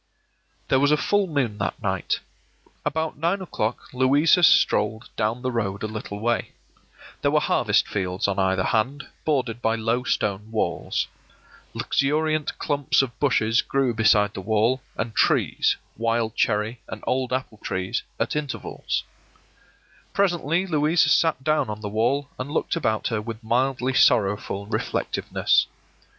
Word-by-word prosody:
There 130 - +4
was 145 +1 +3
a 150 - +4
full 205 +4 +1
moon 130 -10 -1
that 100 - -2
night. - - -1 0.6
About 160 0 -2
nine 170 +5 +1
o'clock 120 - -4
Louisa 140 +7 +4
strolled 110 -8 +3
down 115 +3 -1
the 130 - 0
road 100 -4 -2
a - - 0
little 105 -1 -6
way. 120 +2 -1 0.7
There - - +2
were - - +3
harvest - - +2
fields 95 -1 -1
on 100 0 -1
either 95 -1 +2
hand, 130 +8 0 0.2
bordered 125 -6 0
by 115 0 +1
low 115 +2 0
stone 105 -3 -1
walls. 110 -1 -1 0.7
Luxuriant 155 +2 0
clumps 145 -2 +1
of 125 -2 -7
bushes 115 -5 +2
grew 135 -3 0
beside 105 -2 +3
the - - -6
wall, 110 +6 +1 0.2
and 110 +1 -3
trees - - +2
— - - -38
wild 115 0 0
cherry 110 +3 0
and - - -8
old 130 -1 0
apple 125 -4 -3
trees 95 -2 -2
— - - -39
at - - -1
intervals. 145 -3 -3 1.1
Presently 175 -3 +1
Louisa 160 -1 +2
sat 160 -5 +2
down 155 -6 +1
on 105 0 -5
the 105 - -4
wall 120 +7 0
and 130 +2 -4
looked 155 - -1
about 110 -10 0
her 115 -2 -1
with 115 +1 -7
mildly 130 +3 0
sorrowful 100 -3 +2
reflectiveness. 105 - 0
120 Hz, 150 wpm, -24 LUFS, 110-145 Hz, 1.1 s, There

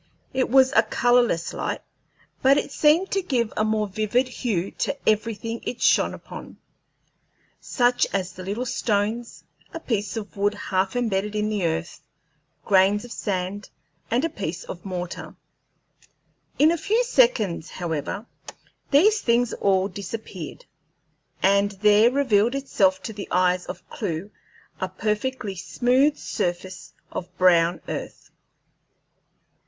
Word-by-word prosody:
It 260 0 0
was 260 +1 +5
a 225 - +8
colorless 240 -6 +2
light, - - -3 0.6
but 270 +2 +5
it 290 - -2
seemed 315 +7 +3
to 390 - +1
give 245 - -1
a 215 - +1
more 215 -1 0
vivid 215 +5 0
hue 215 -8 -2
to 280 - -1
everything 225 +1 0
it 250 - -5
shone - - +3
upon - - -11 1.0
such 245 -1 +2
as 185 -2 -2
the 185 - -9
little 205 +7 -3
stones, 225 0 -1 0.3
a - - -3
piece 210 - -2
of 210 -2 -6
wood 205 +1 +1
half 190 0 -1
embedded 210 -4 -1
in 210 0 0
the 205 -5 0
earth, 165 +1 -4 0.6
grains 200 +2 +3
of 245 - -12
sand, 195 -1 -3 0.4
and 280 +8 0
pieces 175 -3 -4
of 175 - -8
mortar. 180 -2 -6 1.2
In 310 +2 +5
a 340 - -1
few 440 +9 +2
seconds, 465 - +2
however, 175 +4 -4 0.6
these 410 +9 +4
things 235 0 +2
all 195 -1 +2
disappeared, 200 -4 -7 0.8
and 200 +1 +3
there 210 +3 +5
revealed 245 -3 +2
itself 195 -9 +1
to 220 - -5
the 200 -1 -7
eyes 180 0 +2
of - - -8
Clewe 190 -1 -4 0.5
a 185 - -2
perfectly 215 +3 -2
smooth 255 - +2
surface 185 -1 -4 0.2
of 180 - -5
brown 175 -1 +4
earth. - - -6
210 Hz, 130 wpm, -24 LUFS, 190-245 Hz, 1.2 s, a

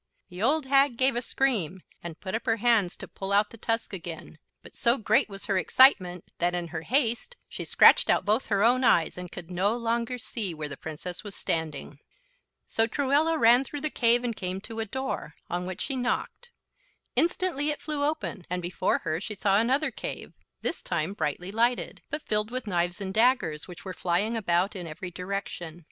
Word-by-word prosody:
The 180 +1 -8
old 285 +6 +2
hag 275 -2 +3
gave 260 0 +3
a 240 - 0
scream 205 - -1 0.2
and 170 -1 -8
put 185 - -6
up 225 +3 -3
her 225 - +3
hands 225 -5 +2
to - - -9
pull 195 0 -6
out 205 +1 +3
the - - -10
tusk 230 -1 -2
again, 165 -3 -7 0.2
but - - -14
so 235 +2 +2
great 220 -1 +2
was 195 0 -7
her 195 -3 +1
excitement 180 -7 +4
that 175 +1 +1
in 175 -1 -3
her 165 -1 -4
haste 240 - 0
she - - -6
scratched - - +6
out - - +3
both 215 +5 +1
her 200 -1 +2
own 250 +3 +4
eyes, 170 -9 +3
and 180 -1 -8
could 175 0 -9
no 200 +6 +1
longer 235 +1 -1
see 215 -7 -3
where 155 -1 -4
the 140 - -7
Princess 160 +5 -6
was 205 -2 -8
standing. 155 -3 -3 0.7
So 225 0 +1
Truella 290 +6 +2
ran 240 -1 +6
through 290 +1 -6
the 305 0 0
cave 240 0 +3
and 235 -2 -2
came 185 -1 -3
to, 225 +2 -7
a 225 - -1
door, 265 +5 -4 0.2
on 180 +1 -2
which 185 -1 -5
she 275 - -2
knocked. 255 - -2 0.7
Instantly 335 -4 +1
it 295 - -2
flew 300 -2 -2
open, 295 - -2
and 180 +1 -1
before 175 +1 0
her 160 +2 -2
she 210 +1 -5
saw 195 0 +3
another 265 +7 +1
cave, - - -6 0.3
this - - -2
time 170 +1 -2
brightly 180 +1 -3
lighted, 235 +3 0
but 305 +1 -3
filled 210 0 +1
with 255 0 -4
knives 175 -1 -1
and 190 -1 -3
daggers, 220 - +2
which 180 +1 -11
were 185 - -5
flying 185 +7 0
about 190 -2 +1
in 180 -3 -6
every 170 +3 -7
direction. 180 -3 -5
210 Hz, 200 wpm, -27 LUFS, 180-250 Hz, 0.7 s, scratched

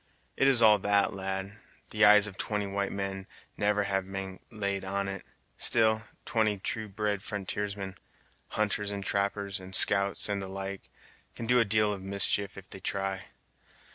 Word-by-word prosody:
"It's 135 -3 +4
all 105 -2 +7
that, 100 +1 +2
lad, 95 +1 -4 0.3
the 110 0 +4
eyes 105 0 +8
of 100 -2 -4
twenty 105 +1 -2
white 100 0 -2
men 95 -1 -4 0.3
never 105 0 +1
having 95 -1 -2
been 95 -1 -5
laid 100 -3 -3
on 100 +1 -2
it; 95 -1 -5 0.3
still, 110 -1 +3 0.2
twenty 110 -2 +1
true 110 +3 -3
bred 105 0 -2
frontiersmen 100 -1 -3 0.5
hunters 105 -1 -1
and 100 -1 -4
trappers, 100 0 -1
and 95 0 -5
scouts, 100 -1 +3
and 100 -1 -2
the 95 - -5
like, 95 0 -6 0.5
can 115 - -5
do 125 +2 +4
a 115 - +4
deal 105 0 +2
of 100 - -7
mischief 100 0 0
if 95 0 -10
they 95 - -9
try. 95 0 -3
100 Hz, 165 wpm, -29 LUFS, 95-105 Hz, 0.5 s, eyes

